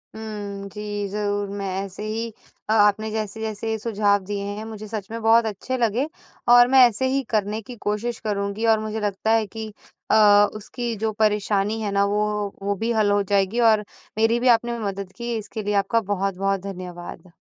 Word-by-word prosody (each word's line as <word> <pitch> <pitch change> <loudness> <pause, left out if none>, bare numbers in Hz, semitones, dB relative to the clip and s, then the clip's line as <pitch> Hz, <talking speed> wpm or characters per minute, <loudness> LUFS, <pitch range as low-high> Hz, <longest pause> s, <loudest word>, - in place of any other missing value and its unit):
उम, 205 -2 -6
जी, 205 0 -4
ज़रूर 205 0 -2
मैं 200 -1 -3 0.2
ऐसे 200 +1 -8
ही 225 +1 -3 0.4
अ, - - +3
आपने 210 0 +3
जैसे-जैसे 220 0 -4
ये 220 - 0
सुझाव 205 -2 +2
दिए 200 0 -3
हैं 215 - -5
मुझे 215 -1 -8
सच 210 -2 -5
में 230 0 -5
बहुत 225 +1 +5
अच्छे 220 +5 -3
लगे, 240 +3 +1 0.4
और 245 0 +8
मैं 265 +1 +5
ऐसे 235 +3 -2
ही 275 +1 +1
करने 215 0 0
की 245 +3 -10
कोशिश 225 +3 -1
करूँगी 200 +1 -1
और 220 - +1
मुझे 215 0 -3
लगता 205 +1 -1
है 225 -1 +3
कि 220 +2 -6 0.4
अ, - - +5 0.4
उसकी 235 +2 -4
जो 220 - +1
परेशानी 210 0 +1
है 210 -2 -2
ना 200 0 +3
वो, 210 0 -1
वो 200 +1 -1
भी 225 +4 -1
हल 215 -3 +2
हो 205 0 +3
जाएगी 200 +3 +1
और 210 -1 +1 0.3
मेरी 225 +2 +3
भी 250 - 0
आपने 235 0 -5
मदद 200 -3 -4
की 235 -1 -3
इसके 215 +1 -6
लिए 205 +1 -1
आपका 230 +3 +1
बहुत-बहुत 195 0 0
धन्यवाद। 180 -2 -8
210 Hz, 190 wpm, -23 LUFS, 200-225 Hz, 0.4 s, और